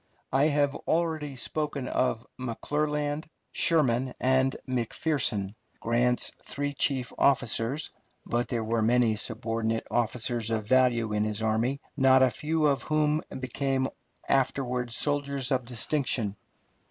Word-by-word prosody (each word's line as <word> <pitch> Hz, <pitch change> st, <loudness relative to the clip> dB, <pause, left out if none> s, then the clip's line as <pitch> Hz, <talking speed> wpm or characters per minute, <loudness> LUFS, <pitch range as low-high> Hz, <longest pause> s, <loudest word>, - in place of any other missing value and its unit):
I 140 Hz, +3 st, +4 dB
have 145 Hz, -2 st, +2 dB
already 160 Hz, -4 st, 0 dB
spoken 145 Hz, 0 st, -3 dB
of 120 Hz, -3 st, 0 dB
McClernand, 145 Hz, +4 st, -2 dB, 0.3 s
Sherman, 130 Hz, -6 st, +2 dB
and 130 Hz, +1 st, +2 dB
McPherson, 120 Hz, -4 st, 0 dB, 0.3 s
Grant's 120 Hz, +1 st, +1 dB
three 145 Hz, +2 st, -3 dB
chief 135 Hz, -2 st, 0 dB
officers, 135 Hz, +1 st, +2 dB, 0.3 s
but 120 Hz, +1 st, -1 dB
there 115 Hz, -2 st, -2 dB
were 115 Hz, +1 st, 0 dB
many 115 Hz, 0 st, +3 dB
subordinate 115 Hz, 0 st, -2 dB
officers 120 Hz, -1 st, 0 dB
of 110 Hz, -2 st, -1 dB
value 120 Hz, -2 st, +3 dB
in 105 Hz, 0 st, +1 dB
his 110 Hz, 0 st, -2 dB
army, 115 Hz, +6 st, 0 dB
not 130 Hz, -1 st, +5 dB
a 130 Hz, -, +4 dB
few 155 Hz, +7 st, 0 dB
of 140 Hz, -2 st, +2 dB
whom 155 Hz, 0 st, +1 dB, 0.2 s
became 130 Hz, +1 st, -1 dB, 0.4 s
afterward 125 Hz, -2 st, 0 dB
soldiers 140 Hz, 0 st, 0 dB
of 130 Hz, -2 st, +1 dB
distinction. 120 Hz, -3 st, 0 dB
130 Hz, 120 wpm, -28 LUFS, 115-145 Hz, 0.4 s, not